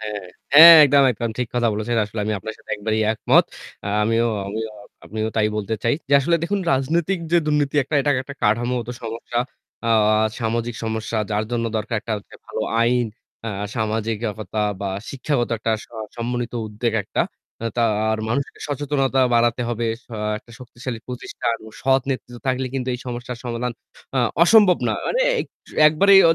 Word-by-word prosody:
হ্যাঁ, 105 -1 -5 0.3
হ্যাঁ 165 +3 +12
একদম, 140 0 +5
একদম 115 0 -3
ঠিক 125 -2 -1
কথা 120 -1 +2
বলেছেন। 110 +3 -2
আসলে 105 +2 -8
আমি 110 - -1
আপনার 110 +3 -7
সাথে - - -14
একবারেই 110 +1 -1
একমত। 110 - +4 0.4
আ - - -3
আমিও 115 +2 +2 0.8
আমিও 110 0 -3
তাই 105 -1 +3
বলতে 105 +1 -2
চাই। 115 - +2
যে 140 - -2
আসলে 170 +5 +2
দেখুন 200 +3 0
রাজনৈতিক 165 +8 +1
যে - - +6
দুর্নীতি 150 -1 +1 0.3
এটা 145 +1 +1
একটা 140 +1 -9
কাঠামোগত 120 +2 +1
সমস্যা। 115 +1 -4 0.5
আ - - +1 0.5
সামাজিক 115 +1 -1
সমস্যা 110 0 -3
যার 105 +1 0
জন্য 120 -1 -1
দরকার 110 +2 -2
একটা 110 0 -4 0.2
যে - - -12
ভালো - - -4 0.2
আইন, 120 0 +2 0.4
আ - - -1 0.3
সামাজিকতা 110 -1 -2 0.2
বা 100 - -2 0.2
শিক্ষাগত 135 -2 -1
একটা 115 +1 -1 0.2
আ - - -8 0.2
সমন্বিত 120 0 -3
উদ্বেগ 110 +2 -2
একটা। - - 0 0.4
আ - - -3
তা 120 - +2 0.3
আর 110 - 0
মানুষকে 135 +5 -2
সচেতনতা 135 -2 0
বাড়াতে 120 +1 +2
হবে। 120 0 -1 0.2
সা 115 - -8 0.2
একটা 120 - -21
শক্তিশালী 120 -1 -7
প্রতিষ্ঠান 120 -2 -3
ও - - -13
সৎ 135 0 +3
নেতৃত্ব 125 -2 -5
থাকলে 130 0 0
কিন্তু 130 -1 -2
এই - - -5
সমস্যার 120 0 -5
সমাধান 120 0 -2 0.4
আ - - +3 0.2
অসম্ভব 200 0 +6
না। - - +1
মানে - - 0 0.2
এ - - 0 0.5
একবারেই 195 +5 +6
120 Hz, 165 wpm, -22 LUFS, 110-135 Hz, 0.8 s, হ্যাঁ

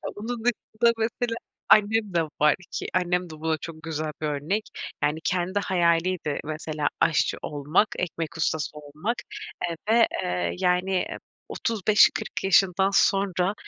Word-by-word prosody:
Bunun 225 +2 -5
dışında 235 -1 +1
mesela 230 +1 -1 0.3
annem 210 -1 +4
de 170 - +3 0.2
var 150 0 +5 0.2
ki - - -4
annem 180 0 0
de 155 -1 -10
buna 160 0 0
çok 160 0 -9
güzel 155 -1 -3
bir 155 - 0
örnek. 150 +9 -1 0.4
Yani, 150 +2 +1
kendi 185 +2 0
hayaliydi 175 -4 +1
mesela 155 -1 -3
aşçı 155 - +2
olmak, 150 +8 +1
ekmek 170 -2 -3
ustası 155 -1 -1
olmak, 150 +10 -4 0.5
eee, 170 - -3 0.2
ve, 230 0 +6 0.2
eee, 90 -1 -1
yani, 180 +1 +1 0.4
35-40 215 -3 +2
yaşından 190 0 +4
sonra, 195 -1 +2
180 Hz, 130 wpm, -25 LUFS, 155-205 Hz, 0.5 s, ve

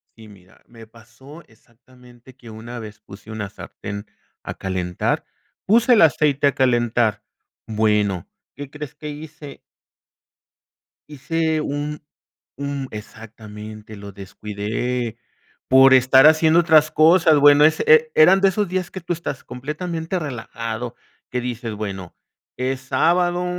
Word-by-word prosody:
Sí, 110 -1 -15
mira, 95 -3 -19
me 115 -1 -14
pasó 120 +7 -16
exactamente 120 +2 -21
que 120 -3 -14
una 115 +3 -9
vez 110 -1 -10
puse 105 0 -13
una 110 -2 -5
sartén 100 +1 -9 0.4
a - - -6
calentar, 90 -2 -3 0.4
puse 235 +5 +4
el 225 - +5
aceite 145 -2 +2
a 140 - +1
calentar. 120 -4 +1 0.4
Bueno, 105 -4 0 0.3
¿qué 145 -1 -8
crees 150 0 -8
que 150 0 -8
hice? 150 -1 -10 1.5
Hice 155 +2 -2
un 150 +1 -4 0.5
un 140 -1 -4
exactamente, 110 0 -11
lo 100 0 -10
descuidé 105 +4 -5 0.5
por 130 +1 +6
estar 130 +2 +6
haciendo 160 +1 +4
otras 155 -3 +4
cosas, 160 -1 +5
bueno, 145 +1 +6
ese 155 +1 +3
e 465 0 +4
eran 455 - +6
de 195 - +4
esos 205 +1 -1
días 185 0 -3
que 190 - -7
tú 170 - -4
estás 160 -5 -5
completamente 160 +7 -5
relajado, 115 -4 -6 0.4
que 125 - -2
dices, 120 -2 -5
bueno, 100 -4 -6 0.4
es 130 +1 -2
sábado, 175 +7 +1
130 Hz, 130 wpm, -21 LUFS, 110-155 Hz, 1.5 s, por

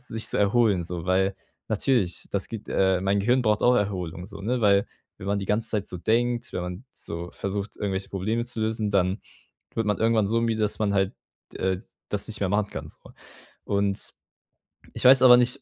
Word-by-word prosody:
sich 110 0 -2
zu - - 0
erholen 105 -2 +3
so, 85 -1 -5
weil 95 +1 +1 0.3
natürlich, 110 -4 0
das 100 -1 -1
gibt, 110 -2 -7
äh 95 -1 +2
mein 100 +1 +2
Gehirn 125 +5 +2
braucht 105 -2 +1
auch 125 0 +5
Erholung 90 -4 -2
so, 100 0 -10
ne? 120 +3 -1
Weil 100 -1 +4 0.3
wenn 95 - -8
man 100 0 +1
die 100 - -3
ganze 110 +1 0
Zeit 105 -2 -1
so 90 - -6
denkt, 120 +4 0
wenn 90 - -2
man 90 +6 -6
so 85 +1 -7
versucht, 100 +1 -4
irgendwelche 95 -1 -3
Probleme 110 +5 -2
zu 115 -2 -6
lösen, 110 -1 -1
dann 95 +1 +1 0.5
wird 115 - 0
man 105 - +1
irgendwann 110 -2 +2
so 115 +1 +1
müde, 115 -1 0
dass 105 - 0
man 105 -2 +1
halt, 95 -1 +1 0.4
äh, 95 -1 -1 0.3
das 105 -1 0
nicht 110 - -6
mehr 95 - +1
machen 105 +1 +1
kann, - - -6
so. - - -15 0.7
Und 100 -1 -1 0.8
ich - - -4
weiß 130 0 +8
aber 125 -1 +9
nicht, 125 +3 +2
100 Hz, 205 wpm, -25 LUFS, 95-115 Hz, 0.8 s, aber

